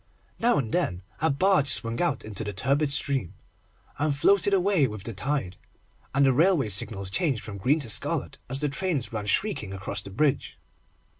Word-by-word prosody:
Now 240 +1 +3
and 115 -5 -2
then 95 - -1 0.2
a 160 - +2
barge 170 0 +2
swung 115 -2 +1
out 175 - -1
into 110 0 -5
the 105 -1 -5
turbid 140 +8 +1
stream, 135 - 0 0.6
and 145 -1 0
floated 200 +6 +3
away 190 -6 +3
with 105 -4 -8
the 115 - -4
tide, 120 -4 -2 0.6
and 140 0 +4
the 135 - +4
railway 160 - +3
signals 100 -1 -2
changed 135 - 0
from 100 -2 -7
green 140 +11 +2
to 130 - -3
scarlet - - +1
as 135 +2 -3
the 150 - +1
trains 145 -5 -2
ran 105 -2 -4
shrieking 105 - 0
across 100 +1 -4
the 100 - -10
bridge. 135 +8 0
135 Hz, 180 wpm, -26 LUFS, 105-155 Hz, 0.6 s, and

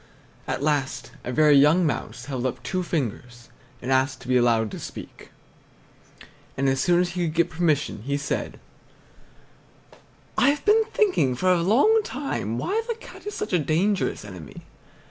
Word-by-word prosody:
At - - -2
last 135 -4 -1
a 125 - -4
very 150 +2 +5
young 150 +6 +5
mouse 125 -4 -3
held 130 -2 -2
up 125 -1 -6
two 185 +6 -2
fingers 120 - -4 0.3
and 130 - -2
asked 130 0 +1
to - - -12
be 130 - +2
allowed 115 -3 +3
to - - -7
speak, - - -10 1.3
and 135 0 +1
as 135 0 +1
soon 175 +3 +3
as 180 - 0
he 175 -1 -2
could 155 - -5
get 170 0 +2
permission 160 -9 0
he 140 +5 -2
said: 145 - -3 1.8
"I've 280 +1 +2
been 435 +2 +4
thinking 385 - +1
for 185 +8 +2
a 175 - +1
long 280 - +4
time 260 - -3
why 420 - -1
the 465 - 0
Cat 455 - -13
is 415 - -4
such 210 - -4
a 180 - +4
dangerous 165 - 0
enemy. 90 -7 -10
150 Hz, 165 wpm, -24 LUFS, 125-185 Hz, 1.8 s, very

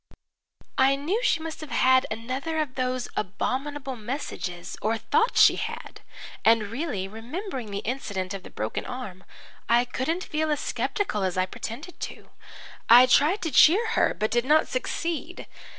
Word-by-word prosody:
"I 270 +1 +5
knew 335 - -1
she 335 - +2
must 325 -1 -6
have 310 - -8
had 260 0 +4
another 255 +8 -3
of 300 -4 -1
those 255 -1 -2
abominable 265 +7 -3
messages 210 -7 -5
or 220 +2 0
thought 465 - +1
she - - +7
had - - -6 0.4
and 220 -2 +3
really, 230 - -3
remembering 245 - -6
the 200 0 -5
incident 200 -7 -3
of 195 - -5
the - - -12
broken 110 +1 -4
arm, 230 -8 -7 0.5
I 240 +1 +4
couldn't 320 +9 -2
feel 310 0 -1
as 300 - 0
sceptical 390 - -2
as 185 -1 -1
I 185 - +2
pretended 245 - -8
to. - - -8 0.6
I 240 +2 +10
tried 300 +10 +3
to 325 - -2
cheer 390 - +6
her, 460 - +2
but 215 0 -1
did 240 +1 +2
not 305 +4 +4
succeed. 330 +5 -3
255 Hz, 160 wpm, -26 LUFS, 220-310 Hz, 0.6 s, I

